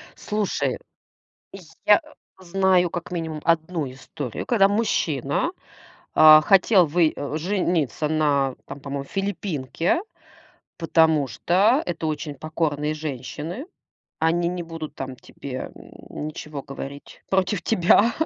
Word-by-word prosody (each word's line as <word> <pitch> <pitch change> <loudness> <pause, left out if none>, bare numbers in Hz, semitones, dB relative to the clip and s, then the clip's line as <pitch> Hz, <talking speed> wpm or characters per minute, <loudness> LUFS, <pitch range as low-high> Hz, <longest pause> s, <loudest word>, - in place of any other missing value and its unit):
Слушай, 210 -2 -1 1.1
я 210 - +6 0.4
знаю, 185 -1 +2
как 175 +1 -6
минимум, 160 -3 -4
1 160 -3 0
историю, 135 -1 -6
когда 210 -5 +4
мужчина, 185 - 0 0.6
а, 155 0 +9
хотел 190 +2 +5
вы 160 0 +2
э, 145 +2 -3
жениться 170 - 0
на 145 -4 +1
там, 135 - -8
по-моему, 140 0 -5
филиппинке, 180 - -2 0.8
потому 160 -4 +3
что 195 - +2
это 165 -2 -3
очень 155 -1 -3
покорные 155 0 -2
женщины. 155 - -5 0.5
Они 170 +2 +2
не 180 0 -3
будут 165 -2 -7
там 130 -1 -6
тебе, 130 +1 -7
м, 150 - -9
ничего 150 -2 -7
говорить 140 0 -9
против 190 0 +1
тебя, 205 +4 +4
160 Hz, 110 wpm, -24 LUFS, 145-180 Hz, 1.1 s, а